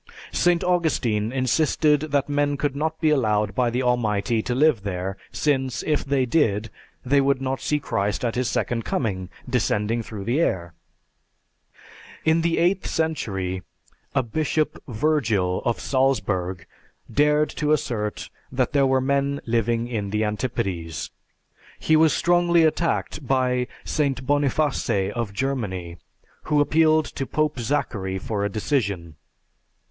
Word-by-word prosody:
St. 175 Hz, -1 st, +2 dB
Augustine 135 Hz, -12 st, +1 dB
insisted 150 Hz, +3 st, +2 dB
that 140 Hz, -1 st, +1 dB
men 145 Hz, 0 st, 0 dB
could 140 Hz, -1 st, -1 dB
not 160 Hz, +2 st, -2 dB
be 155 Hz, -2 st, +3 dB
allowed 105 Hz, -7 st, +1 dB
by 125 Hz, +2 st, +1 dB
the 125 Hz, +2 st, -1 dB
Almighty 115 Hz, -2 st, +1 dB
to 120 Hz, +2 st, -2 dB
live 145 Hz, -4 st, +3 dB
there, 95 Hz, -1 st, -3 dB, 0.2 s
since, 135 Hz, -4 st, 0 dB
if 150 Hz, -2 st, 0 dB
they 135 Hz, -1 st, +1 dB
did, 115 Hz, -6 st, +1 dB, 0.3 s
they 140 Hz, +2 st, +4 dB
could 135 Hz, -1 st, +2 dB
not 135 Hz, 0 st, -2 dB
see 150 Hz, -, 0 dB
Christ 100 Hz, -4 st, -1 dB
at 115 Hz, -, 0 dB
His 125 Hz, -1 st, 0 dB
second 115 Hz, -2 st, -1 dB
coming, 95 Hz, -8 st, -2 dB, 0.2 s
descending 115 Hz, -2 st, 0 dB
through 105 Hz, -3 st, -7 dB
the 120 Hz, +9 st, 0 dB
air. 85 Hz, -, 0 dB, 1.5 s
In 160 Hz, +1 st, +4 dB
the 165 Hz, 0 st, +1 dB
eighth 180 Hz, +3 st, +2 dB
century, 95 Hz, -, -2 dB, 0.5 s
a 135 Hz, -, +3 dB
Bishop 155 Hz, +5 st, -1 dB
Virgil 110 Hz, -8 st, +1 dB
of 120 Hz, -, 0 dB
Salzburg 100 Hz, -10 st, 0 dB, 0.5 s
dared 150 Hz, +1 st, +3 dB
to 150 Hz, 0 st, -1 dB
assert 105 Hz, -7 st, -1 dB, 0.2 s
that 130 Hz, 0 st, 0 dB
there 140 Hz, -2 st, +4 dB
were 130 Hz, 0 st, +2 dB
men 140 Hz, +1 st, 0 dB
living 115 Hz, 0 st, 0 dB
in 105 Hz, -5 st, -3 dB
the 105 Hz, +2 st, 0 dB
antipodes. 105 Hz, -, -3 dB, 0.7 s
He 160 Hz, -, +2 dB
was 160 Hz, 0 st, +5 dB
strongly 175 Hz, -1 st, +3 dB
attacked 160 Hz, -3 st, 0 dB
by 125 Hz, -1 st, +1 dB, 0.2 s
St. 135 Hz, -4 st, -1 dB
Boniface 140 Hz, -8 st, +1 dB
of 115 Hz, -2 st, -3 dB
Germany, 100 Hz, -8 st, -3 dB, 0.5 s
who 150 Hz, -1 st, +2 dB
appealed 155 Hz, +1 st, +4 dB
to 135 Hz, -, -5 dB
Pope 150 Hz, -2 st, 0 dB
Zachary 105 Hz, -6 st, -1 dB
for 100 Hz, +1 st, -3 dB
a 100 Hz, -, 0 dB
decision. 100 Hz, -, -1 dB
130 Hz, 140 wpm, -24 LUFS, 105-150 Hz, 1.5 s, was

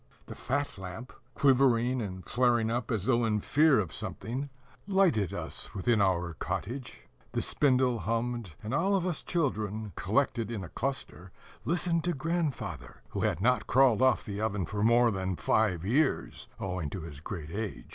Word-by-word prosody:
The -, -, -8 dB
fat 140 Hz, -4 st, -2 dB
lamp, 95 Hz, +7 st, -8 dB, 0.2 s
quivering 130 Hz, -2 st, +3 dB
and 95 Hz, -4 st, -6 dB
flaring 120 Hz, -3 st, +2 dB
up 120 Hz, -1 st, -2 dB
as 105 Hz, -4 st, -1 dB
though 120 Hz, -1 st, +3 dB
in 110 Hz, -2 st, +1 dB
fear 150 Hz, +5 st, +4 dB
of 85 Hz, -7 st, -2 dB
something, 130 Hz, +6 st, -4 dB, 0.4 s
lighted 185 Hz, -, +3 dB
us -, -, -5 dB
within 105 Hz, +2 st, +2 dB
our 90 Hz, -3 st, +1 dB
cottage; 125 Hz, -, -5 dB, 0.3 s
the -, -, 0 dB
spindle 130 Hz, -4 st, +3 dB
hummed; 115 Hz, -2 st, -2 dB
and 110 Hz, +4 st, -4 dB
all 190 Hz, +7 st, +2 dB
of 185 Hz, -2 st, 0 dB
us 175 Hz, -5 st, -2 dB
children, 110 Hz, -, -2 dB
collected 115 Hz, +1 st, 0 dB
in 110 Hz, -5 st, -4 dB
a 85 Hz, -, -8 dB
cluster, 95 Hz, -, -4 dB, 0.3 s
listened 170 Hz, -1 st, +1 dB
to 175 Hz, -, +1 dB
grandfather, 135 Hz, -, -3 dB
who -, -, -4 dB
had 90 Hz, -, 0 dB
not 125 Hz, 0 st, +2 dB
crawled 130 Hz, -3 st, +4 dB
off 130 Hz, -2 st, +3 dB
the 100 Hz, 0 st, -4 dB
oven 100 Hz, -4 st, -1 dB
for 105 Hz, +4 st, -4 dB
more 115 Hz, +2 st, +5 dB
than 95 Hz, -2 st, -2 dB
five 90 Hz, -3 st, +1 dB
years, 135 Hz, +7 st, 0 dB
owing 90 Hz, -5 st, -3 dB
to 95 Hz, -, -5 dB
his 75 Hz, -3 st, -8 dB
great 80 Hz, -1 st, -6 dB
age. 105 Hz, 0 st, -4 dB
115 Hz, 165 wpm, -30 LUFS, 95-135 Hz, 0.4 s, more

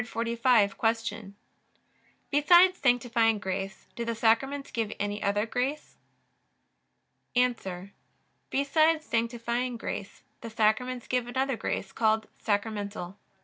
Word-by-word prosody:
Q. 230 Hz, -3 st, 0 dB, 1.0 s
Besides 350 Hz, +6 st, +6 dB
sanctifying 235 Hz, -3 st, +2 dB
grace 195 Hz, -1 st, -4 dB
do 235 Hz, -, -3 dB
the 230 Hz, 0 st, -2 dB
Sacraments 270 Hz, +5 st, +1 dB
give 225 Hz, -3 st, -2 dB
any 205 Hz, 0 st, -2 dB
other 205 Hz, +1 st, +1 dB
grace? 260 Hz, +6 st, -3 dB, 1.4 s
A. 250 Hz, 0 st, +3 dB, 0.9 s
Besides 310 Hz, +3 st, +2 dB
sanctifying 235 Hz, +1 st, -1 dB
grace 205 Hz, -2 st, -6 dB, 0.2 s
the 230 Hz, -, -6 dB
Sacraments 230 Hz, +3 st, 0 dB
give 250 Hz, -1 st, -1 dB
another 265 Hz, +1 st, -1 dB
grace, 195 Hz, -3 st, -3 dB
called 220 Hz, -1 st, +1 dB
sacramental. 205 Hz, -3 st, -3 dB
230 Hz, 100 wpm, -28 LUFS, 215-255 Hz, 1.4 s, Besides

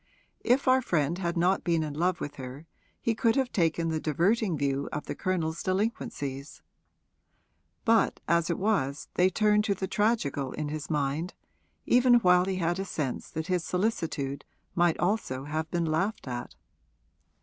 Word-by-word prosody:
If 255 Hz, +3 st, +2 dB
our 260 Hz, 0 st, +5 dB
friend 170 Hz, -, 0 dB
had 170 Hz, -1 st, -2 dB
not 180 Hz, +3 st, +2 dB
been 165 Hz, -2 st, +1 dB
in 150 Hz, -2 st, -4 dB
love 175 Hz, +4 st, 0 dB
with 145 Hz, -, -6 dB
her 130 Hz, +3 st, -8 dB, 0.3 s
he 230 Hz, -, 0 dB
could 225 Hz, +1 st, +2 dB
have 265 Hz, -2 st, +1 dB
taken 165 Hz, -2 st, +1 dB
the 160 Hz, -1 st, -1 dB
diverting 175 Hz, -, +1 dB
view 140 Hz, 0 st, -1 dB
of 150 Hz, -, -4 dB
the -, -, -4 dB
Colonel's 170 Hz, -4 st, -2 dB
delinquencies; 155 Hz, -, -3 dB, 1.2 s
but 225 Hz, -1 st, +3 dB
as 170 Hz, 0 st, +2 dB
it 170 Hz, -, 0 dB
was 165 Hz, -10 st, 0 dB
they 180 Hz, +1 st, +4 dB
turned 210 Hz, +2 st, +3 dB
to 200 Hz, -, +1 dB
the 190 Hz, -, -3 dB
tragical 190 Hz, -, 0 dB
in 150 Hz, -1 st, -3 dB
his 155 Hz, 0 st, -5 dB
mind, 150 Hz, +3 st, -1 dB, 0.5 s
even 245 Hz, 0 st, +5 dB
while 180 Hz, -6 st, +5 dB
he 190 Hz, 0 st, -1 dB
had 175 Hz, 0 st, 0 dB
a -, -, -1 dB
sense 150 Hz, -8 st, -4 dB
that 160 Hz, 0 st, -4 dB
his 180 Hz, -1 st, 0 dB
solicitude 165 Hz, -8 st, -2 dB, 0.3 s
might 175 Hz, -1 st, +2 dB
also 175 Hz, -9 st, -1 dB
have 155 Hz, +2 st, -3 dB
been 170 Hz, 0 st, 0 dB
laughed 165 Hz, +4 st, -1 dB
at. 120 Hz, -1 st, -5 dB
170 Hz, 165 wpm, -28 LUFS, 150-195 Hz, 1.2 s, our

